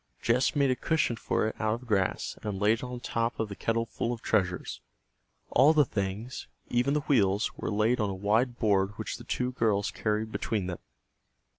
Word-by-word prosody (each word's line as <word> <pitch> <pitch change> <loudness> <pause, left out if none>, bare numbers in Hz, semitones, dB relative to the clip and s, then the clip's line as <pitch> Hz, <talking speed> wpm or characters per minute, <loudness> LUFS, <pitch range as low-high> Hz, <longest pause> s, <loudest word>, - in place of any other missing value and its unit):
Jess 125 +6 +2
made 140 -2 +3
a - - +2
cushion 155 -4 +1
for 110 - 0
it 110 - -2
out 110 0 +1
of 125 +2 -10
grass 95 -4 0
and 105 -3 -3
laid 105 +3 +3
it - - -8
on 125 -1 -6
top 115 0 -1
of 110 -2 -1
the 100 - -6
kettle 115 +2 0
full 115 +1 -3
of 120 -2 -5
treasures. 90 - 0 0.7
All 145 +4 +6
the 150 -2 +5
things, 100 +4 -4 0.2
even 125 +4 +2
the 150 - +1
wheels, 105 -7 +2
were - - -4
laid 110 +4 +2
on 105 -2 +1
a 95 - -3
wide 110 +6 +1
board 100 -2 +1
which - - -4
the - - -11
two 125 0 -1
girls 105 -5 +1
carried 110 0 -1
between 105 -4 -2
them. 90 -2 -4
110 Hz, 200 wpm, -29 LUFS, 100-125 Hz, 0.7 s, All